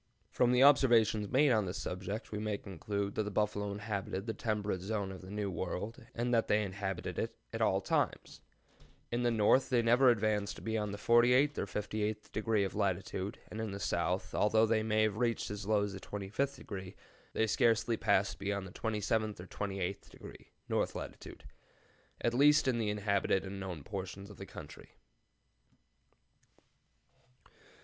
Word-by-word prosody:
] - - -46
"From 125 -1 +3
the 125 +1 +5
observations 115 -7 +5
made 140 +1 +4
on 110 -5 +2
this 90 - -4
subject 95 +4 -5
we 105 - -3
may 105 -1 -1
conclude 100 +2 -4
that - - 0
the 105 - -2
buffalo 105 0 -1
inhabited 100 -1 -4
the 110 - -2
temperate 105 -7 -2
zone 100 0 -2
of 95 - -9
the 95 - -11
New 105 -1 -2
World, 105 +7 -4
and 120 +1 0
that 115 -1 +3
they 105 +1 +3
inhabited 95 -2 -4
it - - -3 0.2
at - - -3
all - - +3
times. - - -1 0.7
In 120 +1 0
the 120 - +3
north 115 +3 +3
they 120 -3 +3
never 120 +3 +5
advanced 105 -3 0
beyond 110 -2 -1
the 100 - -5
48th 125 +6 +4
or - - -2
58th 105 +2 -3
degree 110 -1 +1
of 95 - -2
latitude, 95 -1 -2
and 110 - -4
in 110 -3 -3
the 100 - -5
south, 90 0 -1
although 110 +2 +4
they 110 0 +2
may 110 0 +2
have 110 -1 0
reached 115 -3 0
as 105 -1 -6
low 105 -1 +3
as 100 -1 -3
25°, 100 0 -4 0.4
they 110 - +2
scarcely 115 +1 +2
passed 100 -3 +1
beyond 100 -1 -2
the 95 - -9
27th 110 -1 -1
or 90 - -7
28th 95 -1 -4
degree - - -12 0.2
(north - - 0
latitude), - - -8 0.8
at 120 - +1
least 145 +3 +5
in 125 -3 +2
the 110 -2 0
inhabited 100 -2 +1
and 95 +1 -6
known 90 -6 -5
portions 95 +1 -6
of 105 - -13
the - - -8
country." - - -11
105 Hz, 170 wpm, -33 LUFS, 100-115 Hz, 0.8 s, the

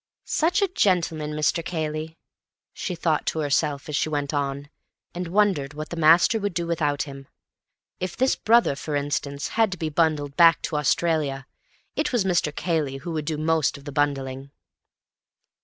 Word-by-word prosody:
"Such 350 +6 +1
a - - +3
gentleman, 170 - 0
Mr. 155 +2 0
Cayley," 155 -1 -4 0.6
she 180 - -4
thought 165 -2 0
to 160 - 0
herself 145 0 0
as 150 - -3
she 155 - 0
went 145 -1 -2
on, 140 0 -2 0.4
and 180 0 -4
wondered 170 -7 +1
what 155 +1 -6
the - - -5
master 170 +7 +5
would 200 -4 -3
do 170 0 -1
without 150 -4 0
him. 135 -2 -10 0.7
If 185 -1 -4
this 260 +1 +2
brother, 230 -9 +3
for 150 +1 -4
instance, 140 0 -2
had 225 -3 +2
to - - -7
be 160 -1 -2
bundled 150 -3 0
back 170 -1 +6
to - - -3
Australia, 150 -2 0 0.5
it 300 0 0
was 240 -5 +2
Mr. 175 -5 +1
Cayley 150 -4 -1
who 165 +5 -6
would 155 -2 -3
do 155 0 -2
most 155 -1 +1
of 140 - -15
the 145 - -6
bundling. 135 -1 -1
155 Hz, 175 wpm, -24 LUFS, 145-175 Hz, 0.7 s, back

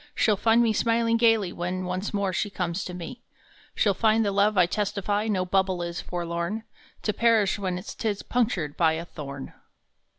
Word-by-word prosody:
She 220 - +3
ll - - +4
find 225 +3 +3
me 225 -2 +2
smiling 230 +1 +2
gaily 225 -5 +3
when 185 +1 -3
Once 185 +3 -3
more 200 -2 -1
she 205 +3 -1
comes 180 -1 -3
to 180 - -6
me. 180 +7 -8 0.5
She - - +2
ll 200 - +4
find 220 +2 +2
the 200 - +1
love 200 +1 +2
I 180 - +6
testify 205 +2 -1
No 190 -4 0
bubble 185 -1 +1
is, 170 0 -4
forlorn, 170 +4 -3 0.4
To 210 - 0
perish 225 -4 +3
when 185 -2 -2
tis 210 -3 -3
punctured 205 - -1
by 160 -2 +3
A 165 +1 -4
thorn 140 -4 -8
195 Hz, 190 wpm, -26 LUFS, 175-220 Hz, 0.5 s, I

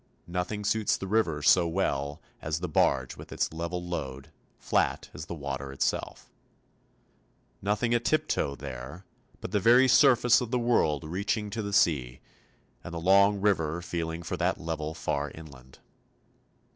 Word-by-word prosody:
Nothing 90 +4 -3
suits 105 0 +1
the - - -6
river 95 -8 0
so 85 +3 +5
well 75 -4 -2 0.2
as 75 +1 -2
the 90 - -3
barge 65 -4 +1
with - - -11
its - - -1
level 85 +2 -4
load, 70 -6 -5 0.3
flat - - 0
as 80 - -8
the 85 - -5
water 70 -2 -5
itself. 70 - -3 1.3
Nothing 105 +4 0
a 120 - +3
tiptoe 135 - 0
there; 65 +9 -8 0.4
but - - -6
the 105 - +2
very 120 +6 +6
surface 125 -2 +5
of 120 - -4
the 125 - 0
world 115 - +1
reaching 100 +6 -2
to 110 +2 -3
the 100 -1 -4
sea, 70 -11 +2 0.6
and 85 - -7
the - - -3
long 100 +3 +4
river 85 -6 +1
feeling 85 -1 -4
for - - -4
that - - 0
level 80 -1 -4
far 75 -3 -2
inland. 65 -5 -13
85 Hz, 155 wpm, -28 LUFS, 75-105 Hz, 1.3 s, very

